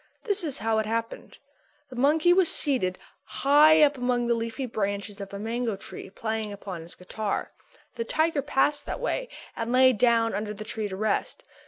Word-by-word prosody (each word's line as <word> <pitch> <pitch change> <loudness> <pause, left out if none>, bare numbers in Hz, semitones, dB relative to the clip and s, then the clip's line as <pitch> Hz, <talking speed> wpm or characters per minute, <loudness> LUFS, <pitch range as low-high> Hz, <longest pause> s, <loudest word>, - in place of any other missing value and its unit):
This 410 -4 0
is 295 -5 -1
how 220 0 0
it 215 - -2
happened. 230 +1 -4 0.5
The - - -8
monkey 305 +7 +4
was 365 -2 +4
seated 245 - +1 0.3
high 295 +8 +5
up 290 -2 +3
among 245 -1 0
the 235 - +2
leafy 230 +3 -3
branches 200 -2 -3
of 195 - -7
a 200 - -6
mango 225 +1 -2
tree 195 - -9
playing 220 +1 -4
upon 195 -4 -7
his 165 +1 -11
guitar. 205 +3 -4 0.4
The 235 - -3
tiger 315 +4 +1
passed 290 +1 0
that - - -4
way - - -2 0.3
and 230 +1 -3
lay 255 0 +6
down 230 0 +2
under 210 0 -3
the 215 - -7
tree 215 0 -4
to 190 - -6
rest. 215 +3 -1
230 Hz, 185 wpm, -26 LUFS, 210-280 Hz, 0.5 s, lay